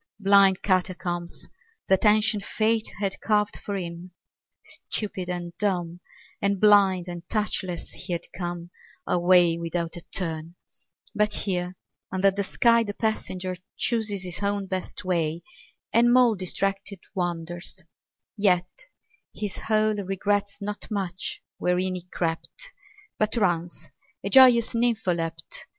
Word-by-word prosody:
Blind 195 -2 +5
catacombs 180 -2 -1 0.4
that 190 +3 +3
ancient 210 -1 +4
fate 220 +1 +1
Had 195 -2 -2
carved 210 -1 +1
for 200 - -5
him. 175 -1 -5 0.8
Stupid 190 -4 -1
and 175 -1 -4
dumb 175 -4 -1 0.4
And 200 -1 +1
blind 195 -3 +5
and 175 -1 -6
touchless 190 -5 -2
he 180 - -7
had 170 0 -3
come 175 -1 -5 0.3
A 180 - +1
way 175 -1 +5
without 170 0 -3
a 175 - -7
turn; 165 -2 -2 0.6
but 210 0 +2
here 180 -2 -1 0.4
Under 190 +1 +3
the 200 +1 -2
sky 235 +4 +3
the 205 -2 -5
passenger 185 -4 -2 0.2
Chooses 215 -5 0
his 180 0 -5
own 200 0 0
best 185 -1 -5
way, 170 -2 0 0.5
and 240 +1 +5
mole 245 -2 +6
Distracted 195 0 -2
wanders; 175 0 -4 0.5
yet 180 -4 +2 0.7
his 205 -3 -4
hole 215 0 +3
Regrets 200 0 -1
not 205 0 -5
much 190 -4 -3 0.2
wherein 180 +1 +1
he 180 -1 -6
crept 170 - -4 0.5
But 215 +2 +1
runs, 170 -5 -1 0.3
a 200 - -3
joyous 245 -2 +7
nympholept. 180 -9 -1
190 Hz, 125 wpm, -26 LUFS, 175-210 Hz, 0.8 s, joyous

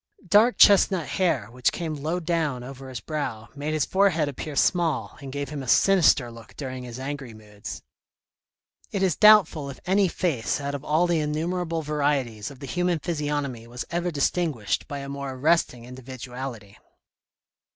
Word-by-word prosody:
Dark 220 +6 +5
chestnut 190 -4 +5
hair, 140 - 0
which 125 0 +1
came 165 -2 -4
low 155 +4 -2
down 160 -7 -1
over 135 +1 -9
his 125 -3 -5
brow, 120 -4 -4
made 145 +2 -3
his 150 - +1
forehead 190 -6 +2
appear 145 +2 -6
small 155 - +1
and 135 -1 -7
gave 140 0 -4
him 145 -1 -5
a 130 - -8
sinister 155 -7 +4
look 115 -2 -14
during 130 -3 -5
his 120 -1 -8
angry 135 -3 -6
moods. 105 -1 -9 1.1
It 195 -2 -1
is 180 -5 +2
doubtful 195 -9 +5
if 135 - -9
any 195 +1 +3
face 160 -10 -1
out 140 0 -3
of 140 -1 -5
all 155 +4 +2
the 170 -2 +1
innumerable 165 +2 -2
varieties 140 -8 -1
of 140 - -12
the - - -5
human 180 +4 0
physiognomy 145 -7 -3
was 120 +1 -6
ever 175 +1 -1
distinguished 140 - -1
by 145 - -5
a 140 - -7
more 140 -1 -5
arresting 130 -3 +1
individuality. 125 -3 -8
145 Hz, 165 wpm, -25 LUFS, 125-170 Hz, 1.1 s, Dark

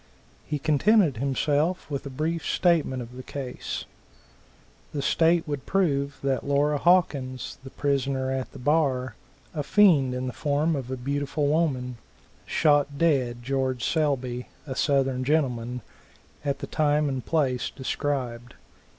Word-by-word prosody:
He 150 - -1
contented 155 - +3
himself 145 +6 0
with 140 0 -3
a - - -5
brief 160 +5 -2
statement 155 -8 +1
of 120 +1 -12
the 130 - -7
case. 130 -1 -5 1.1
The 145 - -2
state 165 +3 +3
would 145 -3 -4
prove 145 -7 +1
that 135 -1 0
Laura 145 +1 +2
Hawkins, 140 -8 +1
the 135 - -8
prisoner 135 -2 -1
at 130 -1 -3
the - - -11
bar, 130 -3 +1 0.4
a 155 - -2
fiend 150 -7 +4
in 125 0 -3
the 125 - -4
form 150 +5 0
of 130 -3 -4
a 130 - -3
beautiful 140 +3 -1
woman, 140 -5 0 0.5
shot 145 -2 +2
dead 130 -7 +1
George 130 -1 -1
Selby, 130 -6 0 0.2
a 135 -3 -5
Southern 135 -2 +1
gentleman, 125 -4 0 0.6
at 140 -1 -1
the - - -2
time 150 -1 +2
and 135 -3 -2
place 135 -6 0
described. 125 -3 -3
140 Hz, 140 wpm, -26 LUFS, 130-150 Hz, 1.1 s, fiend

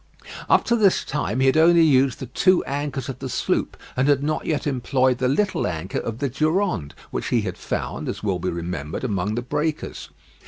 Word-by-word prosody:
Up - - +5
to 235 - +2
this 205 -5 +3
time 130 -4 -2
he - - +4
had 135 +3 +4
only 170 +1 +6
used 135 -4 +3
the 135 - -5
two 185 +8 +3
anchors 140 -2 -3
of 135 - -6
the - - -5
sloop - - -1 0.2
and 130 +2 +2
had 140 -1 +3
not 155 +1 -2
yet 155 -3 -1
employed 130 -2 +1
the 130 - +1
little 190 +9 +1
anchor 85 +1 -3
of 115 -1 -4
the 140 - -1
Durande, 155 - 0 0.2
which - - -3
he - - +2
had - - -4
found, - - -4
as - - -5
will 95 -4 0
be 90 - -2
remembered, 85 - -4
among 105 -3 -1
the 120 - -2
breakers. 150 +4 -3
135 Hz, 205 wpm, -23 LUFS, 110-155 Hz, 0.2 s, only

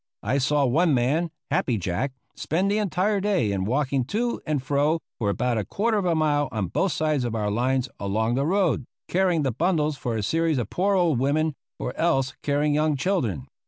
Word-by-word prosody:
I 140 - +1
saw 145 +1 +2
one 155 +4 +3
man, 145 +8 +1 0.2
Happy 120 -4 +1
Jack, 95 +9 -2 0.2
spend 185 +6 0
the 210 - +1
entire 200 +1 0
day 190 - +1
in 95 -1 -1
walking 135 +3 0
to 235 - -1
and 155 -2 +1
fro 145 +4 +1 0.2
for 105 -4 0
about 120 +2 0
a - - -1
quarter 215 - 0
of 195 - -2
a 170 -2 +2
mile 145 -2 +1
on 105 -6 -2
both 190 - 0
sides 155 -4 0
of 120 -2 -2
our 105 -2 -1
lines 130 +3 +1
along 110 +4 0
the 135 +4 0
road, 180 -7 +1 0.2
carrying 180 -4 +2
the 135 - +1
bundles 155 - 0
for 120 -3 -3
a 105 - -2
series 165 +5 +1
of 115 -4 -3
poor 195 +2 +1
old 170 -8 +2
women, 150 +4 +1 0.2
or 125 - -4
else 135 -6 +1
carrying 145 +1 +1
young 155 0 +2
children. 130 - -1
145 Hz, 200 wpm, -25 LUFS, 125-170 Hz, 0.2 s, one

